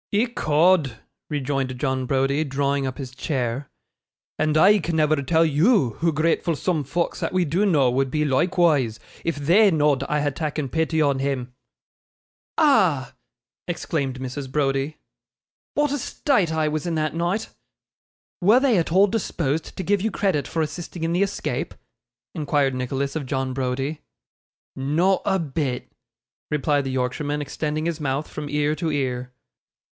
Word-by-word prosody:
'Ecod!' 175 - +2 0.3
rejoined 135 -3 -2
John 130 -2 -1
Browdie, 135 +3 +1
drawing 140 -1 0
up 130 - -5
his 130 -3 -7
chair; 130 -1 -2 0.7
'and 155 0 +2
I 200 +6 +6
can 165 -1 -2
never 155 -1 +3
tell 160 +4 +2
YOU 155 - +3
hoo 165 0 +2
gratful 165 +2 +1
soom 160 0 -1
folks 165 +6 -2
that - - -2
we 185 -1 +2
do 180 +8 +1
know 140 -9 +3
would 135 +1 +1
be 150 +3 0
loikewise, 145 -5 +2 0.3
if 165 - -1
THEY 175 +9 +4
know'd 150 -5 +2
I 150 0 +1
had 145 -2 -1
takken 150 -4 -3
pity 160 +1 +1
on 140 -2 +1
him.' 135 -2 -2 1.0
'Ah!' 185 - +3 0.5
exclaimed 140 -6 -2
Mrs. 130 +1 -5
Browdie, 140 +1 0 0.8
'what 295 -1 +2
a 290 - -1
state 220 - +1
I 160 -1 +1
was 155 +2 -2
in 170 - -1
that 155 -1 -1
night!' 175 +6 -1 0.9
'Were 210 +7 +6
they 255 -8 +3
at 165 - -2
all 190 +3 +6
disposed 165 -8 -2
to 190 - -3
give 200 +2 +1
you 220 - +1
credit 190 -9 0
for 160 - -1
assisting 160 +2 -6
in 165 +1 0
the 180 - +1
escape?' 200 - -2 0.6
inquired 145 -3 +1
Nicholas 135 +3 -2
of 145 -4 -3
John 130 0 -2
Browdie. 135 +3 -2 0.7
'Not 165 +8 +1
a 190 - +2
bit,' 145 -6 -3 0.6
replied 145 -1 +1
the 135 - -2
Yorkshireman, 130 +3 -1
extending 150 +2 -3
his 165 -1 -2
mouth 140 0 -2
from 150 -1 -6
ear 150 +1 +1
to 160 +1 -2
ear. 125 -3 -2
150 Hz, 155 wpm, -23 LUFS, 135-170 Hz, 1.0 s, I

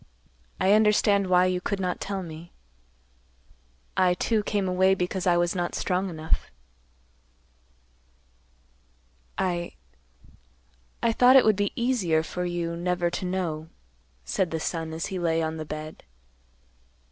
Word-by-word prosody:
I 190 0 +3
understand 210 -2 +3
why 180 0 +4
you 180 -1 0
could 200 +2 -2
not 180 -1 -2
tell 195 -1 -3
me. 165 0 -10 1.4
I, 180 -1 +3
too, 220 +4 0
came 205 -2 -1
away 190 +1 +3
because 180 0 -2
I 175 -1 +4
was 175 0 +1
not 175 -2 -2
strong 185 +1 -1
enough." 160 -2 -2 2.9
"I—I 60 - -6
thought 250 +3 +5
it 265 - +7
would 215 -1 +4
be 205 0 0
easier 205 -11 +1
for 180 +2 -4
you 170 -1 -2
never 175 0 -1
to 185 - -4
know," 170 -4 -3 0.6
said 180 - 0
the 160 - -3
son 160 0 -3
as 160 0 -4
he 185 - -2
lay 165 -1 +1
on 160 0 -2
the 155 - -5
bed. 155 +1 -7
180 Hz, 135 wpm, -26 LUFS, 160-190 Hz, 2.9 s, it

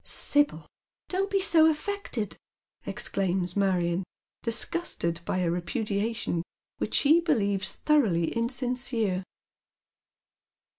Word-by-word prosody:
" - - -42
Sibyl, 290 - +3 0.4
don't 385 +2 0
be 400 -1 +2
so 330 -5 +5
affected! 305 - -3 0.3
" - - -41
exclaims 185 -2 -2
Marion, 185 -2 +1 0.4
disgusted 225 - -1
by - - -1
a 175 -2 +1
repudiation 205 +1 -2 0.4
which - - -2
she 310 +3 +5
believes 205 - 0
thoroughly 210 - +2
insincere. 240 -5 -1
225 Hz, 100 wpm, -28 LUFS, 185-295 Hz, 0.4 s, so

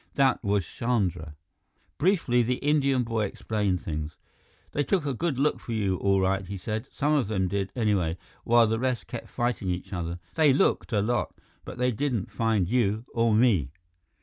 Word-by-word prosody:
That 135 -3 +2
was 100 -3 +1
Chandra. 90 -11 -2 0.6
Briefly, 160 -9 +3
the 125 +2 +1
Indian 140 -2 +2
boy 115 -2 -1
explained 100 -3 -2
things. 75 0 -4 0.5
"They 145 - 0
took 180 -1 0
a 140 - -1
good 155 +1 -1
look 145 +3 +1
for 115 - -6
you, 100 -4 0
all 100 +1 +2
right," 95 +1 +1
he 100 +2 -6
said. 110 +3 -4
"Some 150 +1 0
of 140 -8 +2
them 95 -3 0
did, 100 +1 -2
anyway, 100 -8 +1 0.3
while 120 0 +5
the 110 +1 0
rest 130 -1 -1
kept 120 0 -7
fighting 120 -5 -1
each 90 +3 -4
other. 85 -1 -3 0.2
They 155 -4 +4
looked 135 - +1
a 105 -3 +2
lot, 120 +2 -1 0.3
but - - -8
they 125 0 +1
didn't 120 -3 -2
find 110 -5 +1
you 110 0 +1
or 115 -1 +2
me." 110 - +3
115 Hz, 180 wpm, -27 LUFS, 95-125 Hz, 0.6 s, while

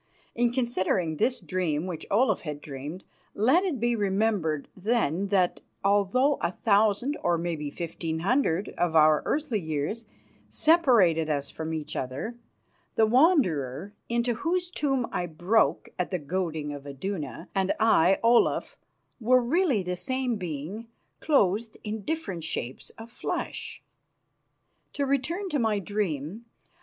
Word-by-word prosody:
In 240 0 +2
considering 190 - 0
this 255 - +1
dream 175 -4 -1
which 175 -4 -6
Olaf 215 0 +2 0.2
dreamed, 145 +6 -7 0.3
let 260 - +4
it 340 -10 -1
be 240 +1 +1
remembered, 195 -7 0
then, 200 -3 0
that 190 -3 +1 0.2
although 205 +8 +3
a 170 - 0
thousand, 215 +6 +2
or 175 -1 +2
maybe 165 -3 -3
fifteen 160 0 -4
hundred, 200 -3 +1
of 175 -2 +1
our 155 -1 +6
earthly 280 -7 0
years 160 +7 -3 0.4
separated 235 - +4
us 140 -2 -2
from 160 0 -5
each 155 -2 -4
other, 135 - -4 0.6
the 220 - +5
Wanderer, 205 - +2 0.2
into 235 +1 +1
whose 350 +8 -1
tomb 270 -7 0
I 175 - -2
broke 175 +7 +1
at 180 - 0
the 185 - -1
goading 160 -2 -3
of 145 0 -9
Iduna, 145 - -5
and 195 -1 +1
I, 195 -4 +5
Olaf, 235 +1 +3 0.4
were 255 +2 +4
really 275 - +2
the 180 0 -2
same 255 +4 -1
being 180 +5 -5 0.3
clothed 220 - +1
in 215 0 -4
different 200 - -4
shapes 130 -5 -4
of 225 +1 -10
flesh. - - -5 1.1
To 285 - -1
return 300 +9 -1
to 295 - 0
my 220 -3 +1
dream. 200 -1 -3
200 Hz, 135 wpm, -27 LUFS, 160-240 Hz, 1.1 s, our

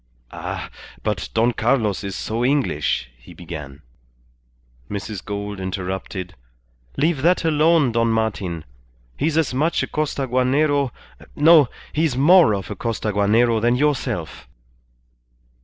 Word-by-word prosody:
"Ah! - - -6 0.3
But - - -2
Don 115 +2 +3
Carlos 115 -4 0
is 100 -1 -4
so 115 +2 -3
English," 125 - 0
he - - -15
began. 75 -4 -9 1.1
Mrs. 100 -1 -5
Gould 100 0 -5
interrupted 95 0 -5 0.6
"Leave 160 -3 +1
that 170 +2 +2
alone, 155 -3 +3
Don 115 0 +1
Martin. 100 -7 -2 0.5
He's 155 +2 0
as 160 -5 +1
much 155 +6 +1
a - - -3
Costaguanero 140 0 +1 0.5
No! 155 -3 +6 0.2
He's 155 -4 0
more 155 - +6
of 95 -3 -6
a - - -4
Costaguanero 110 +1 +1
than 120 +2 +3
yourself." 125 - -2
120 Hz, 115 wpm, -21 LUFS, 100-145 Hz, 1.1 s, No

